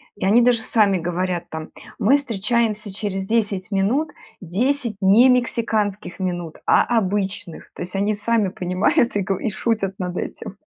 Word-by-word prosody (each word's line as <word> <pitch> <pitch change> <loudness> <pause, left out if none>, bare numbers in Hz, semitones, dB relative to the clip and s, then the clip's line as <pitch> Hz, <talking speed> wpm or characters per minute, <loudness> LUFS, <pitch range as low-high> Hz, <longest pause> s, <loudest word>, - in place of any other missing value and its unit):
и 200 - -3
они 220 +5 +5
даже 240 -2 +3
сами 205 -5 +2
говорят 175 +1 -2
там: 160 0 -7 0.3
"Мы 270 +8 +4
встречаемся 225 -4 -1
через 195 -2 -3
10 210 -2 -1
минут, 230 +11 +1 0.3
10 235 - -1
не 205 +7 +6
мексиканских 220 -6 0
минут, 175 -3 -3
а - - +5
обычных". 195 -4 -2
То - - -10
есть 180 - -6
они 200 +2 +1
сами 210 -1 0
понимают 185 +6 +1
и 205 - +1
го 195 -1 -1
шутят 200 -2 -1
над 180 -1 -4
этим. 205 -3 -6
205 Hz, 150 wpm, -21 LUFS, 185-230 Hz, 0.3 s, не